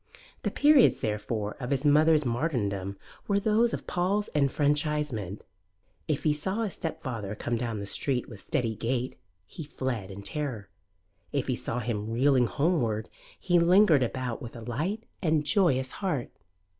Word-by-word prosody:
The -, -, 0 dB
periods, 290 Hz, -3 st, +5 dB
therefore, 105 Hz, -1 st, -2 dB
of 125 Hz, -2 st, -4 dB
his 140 Hz, +1 st, 0 dB
mother's 155 Hz, +1 st, +5 dB
martyrdom 105 Hz, -, -1 dB, 0.3 s
were 200 Hz, -1 st, +2 dB
those 220 Hz, +3 st, +3 dB
of -, -, -4 dB
Paul's 195 Hz, +4 st, 0 dB
enfranchisement. 145 Hz, -, 0 dB, 0.6 s
If 155 Hz, -3 st, -1 dB
he 150 Hz, -, +3 dB
saw 190 Hz, +9 st, -1 dB
his 205 Hz, -, -3 dB
stepfather 115 Hz, -10 st, -4 dB
come 120 Hz, +2 st, -2 dB
down 115 Hz, -2 st, -2 dB
the 100 Hz, -, -4 dB
street 125 Hz, +4 st, -1 dB
with 105 Hz, -5 st, -11 dB
steady 120 Hz, -7 st, -1 dB
gait, 120 Hz, +4 st, -2 dB, 0.3 s
he 160 Hz, -, -8 dB
fled 130 Hz, -8 st, -4 dB
in 100 Hz, +1 st, -8 dB
terror; 125 Hz, -7 st, -2 dB, 0.6 s
if -, -, 0 dB
he -, -, 0 dB
saw 115 Hz, -, -3 dB
him 110 Hz, -2 st, -3 dB
reeling 125 Hz, +1 st, +3 dB
homeward 120 Hz, -8 st, 0 dB, 0.3 s
he 175 Hz, -2 st, +3 dB
lingered 170 Hz, -3 st, +5 dB
about 125 Hz, 0 st, -2 dB
with 120 Hz, -2 st, -8 dB
light 170 Hz, -, -2 dB, 0.2 s
and 155 Hz, -4 st, +1 dB
joyous 140 Hz, -, +2 dB
heart. 175 Hz, -11 st, -2 dB
135 Hz, 150 wpm, -28 LUFS, 115-160 Hz, 0.6 s, periods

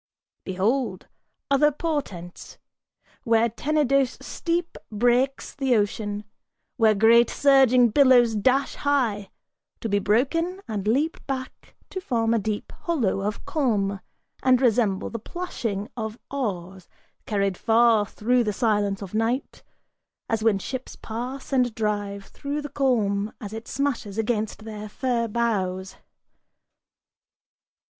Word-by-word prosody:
Behold! 195 Hz, +2 st, -1 dB, 0.5 s
Other 295 Hz, +2 st, +5 dB
portents: 275 Hz, -, -5 dB, 0.7 s
Where 230 Hz, -1 st, +3 dB
Tenedos 275 Hz, +1 st, +1 dB
steep 340 Hz, 0 st, -2 dB, 0.2 s
breaks 245 Hz, +5 st, +1 dB
the 270 Hz, -3 st, +1 dB
ocean 205 Hz, 0 st, -1 dB, 0.5 s
Where 220 Hz, -3 st, +4 dB
great 230 Hz, +3 st, +5 dB
surging 260 Hz, -3 st, +5 dB
billows 245 Hz, -2 st, +5 dB
dash 260 Hz, +6 st, +2 dB
high; 240 Hz, -9 st, 0 dB, 0.5 s
to -, -, -3 dB
be 205 Hz, -1 st, +1 dB
broken, 310 Hz, -, +1 dB
and 210 Hz, -2 st, -3 dB
leap 285 Hz, +9 st, +1 dB
back 260 Hz, -2 st, -6 dB, 0.2 s
To 375 Hz, -, -4 dB
form 230 Hz, -8 st, 0 dB
a 230 Hz, -, +2 dB
deep 210 Hz, 0 st, -3 dB
hollow 260 Hz, -, 0 dB
of 210 Hz, +1 st, -3 dB
calm, 205 Hz, -9 st, 0 dB, 0.4 s
and 255 Hz, -1 st, +4 dB
resemble 225 Hz, -6 st, +1 dB
the 230 Hz, -, -4 dB
plashing 225 Hz, -, -4 dB
Of 220 Hz, -2 st, -4 dB
oars, 190 Hz, -9 st, -4 dB, 0.4 s
carried 200 Hz, -3 st, 0 dB
far 225 Hz, +1 st, +4 dB
through 245 Hz, +5 st, +1 dB
the 210 Hz, -2 st, -1 dB
silence 205 Hz, -2 st, 0 dB
of 195 Hz, -, -9 dB
night, 230 Hz, +5 st, -1 dB, 0.7 s
as 225 Hz, -2 st, -1 dB
when 220 Hz, -3 st, +4 dB
ships 260 Hz, +6 st, -6 dB
pass 250 Hz, +5 st, -6 dB
And 250 Hz, -4 st, +2 dB
drive 205 Hz, -2 st, -2 dB
through 290 Hz, +1 st, -5 dB
the 290 Hz, -, -5 dB
calm 220 Hz, -7 st, 0 dB
as 205 Hz, -1 st, -7 dB
it 225 Hz, +1 st, -7 dB
smashes 250 Hz, -7 st, -2 dB
against 220 Hz, -1 st, -2 dB
their 215 Hz, -1 st, -7 dB
fir 240 Hz, 0 st, -1 dB
bows. 195 Hz, -5 st, -1 dB
230 Hz, 120 wpm, -25 LUFS, 205-265 Hz, 0.7 s, Other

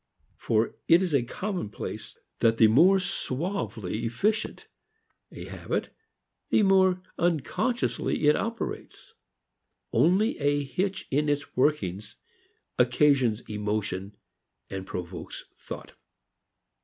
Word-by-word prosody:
For 110 Hz, 0 st, 0 dB
it 170 Hz, +3 st, +6 dB
is 175 Hz, -4 st, -2 dB
a 140 Hz, -, +4 dB
commonplace 175 Hz, -, -5 dB, 0.2 s
that 115 Hz, -1 st, +3 dB
the 110 Hz, -, +7 dB
more 170 Hz, -, +6 dB
suavely 130 Hz, -, -3 dB
efficient 210 Hz, -, -1 dB, 0.7 s
a -, -, -8 dB
habit -, -, -4 dB, 0.6 s
the 215 Hz, -, +4 dB
more 190 Hz, -2 st, +4 dB, 0.2 s
unconsciously 175 Hz, -, 0 dB
it 150 Hz, -, +6 dB
operates. 230 Hz, +1 st, -5 dB, 0.8 s
Only 195 Hz, +7 st, +3 dB
a 145 Hz, 0 st, +1 dB
hitch 185 Hz, +8 st, -2 dB
in 150 Hz, +2 st, +2 dB
its 145 Hz, 0 st, -2 dB
workings 105 Hz, -8 st, 0 dB, 0.6 s
occasions 125 Hz, -2 st, +3 dB
emotion 105 Hz, -1 st, -3 dB, 0.5 s
and 95 Hz, 0 st, -5 dB
provokes 90 Hz, -1 st, -6 dB
thought. -, -, -9 dB
145 Hz, 100 wpm, -27 LUFS, -, 0.8 s, the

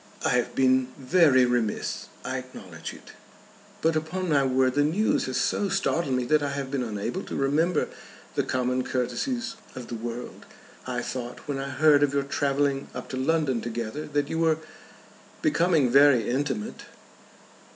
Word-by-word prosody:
"I -, -, +3 dB
have 125 Hz, -1 st, 0 dB
been 130 Hz, -1 st, +3 dB
very 135 Hz, -2 st, +5 dB
remiss. 120 Hz, -4 st, -1 dB, 0.2 s
I -, -, -2 dB
acknowledge -, -, -9 dB
it. -, -, -13 dB, 0.7 s
But 160 Hz, 0 st, +3 dB
upon 170 Hz, +4 st, -2 dB
my 140 Hz, -3 st, +4 dB
word 130 Hz, -1 st, +2 dB
the 145 Hz, -, +2 dB
news 180 Hz, +9 st, +1 dB
has 130 Hz, -, -2 dB
so 200 Hz, -, +1 dB
startled 170 Hz, -8 st, 0 dB
me 125 Hz, -, 0 dB
that 155 Hz, +4 st, +3 dB
I 145 Hz, -, -1 dB
have 140 Hz, -1 st, -4 dB
been 140 Hz, -2 st, -1 dB
unable 110 Hz, -, -3 dB
to -, -, -7 dB
remember 150 Hz, +6 st, +1 dB, 0.5 s
the -, -, +1 dB
common 125 Hz, 0 st, 0 dB
courtesies 225 Hz, -, -2 dB, 0.2 s
of 125 Hz, -2 st, -8 dB
the -, -, -5 dB
world. 120 Hz, +2 st, -7 dB, 0.4 s
I 125 Hz, -1 st, -2 dB
thought 125 Hz, +1 st, -6 dB
when 140 Hz, -2 st, -2 dB
I 135 Hz, 0 st, -4 dB
heard 145 Hz, +2 st, +4 dB
of 140 Hz, -1 st, +2 dB
your 140 Hz, -, +2 dB
travelling 140 Hz, 0 st, 0 dB
up 125 Hz, -, -6 dB
to -, -, -4 dB
London 135 Hz, -2 st, +1 dB
together 120 Hz, +5 st, -4 dB
that 145 Hz, -1 st, 0 dB
you 160 Hz, -, -2 dB
were 160 Hz, -1 st, +3 dB, 0.9 s
becoming 170 Hz, -, +3 dB
very 140 Hz, -4 st, +6 dB
intimate." 125 Hz, -4 st, -2 dB
140 Hz, 165 wpm, -26 LUFS, 125-155 Hz, 0.9 s, very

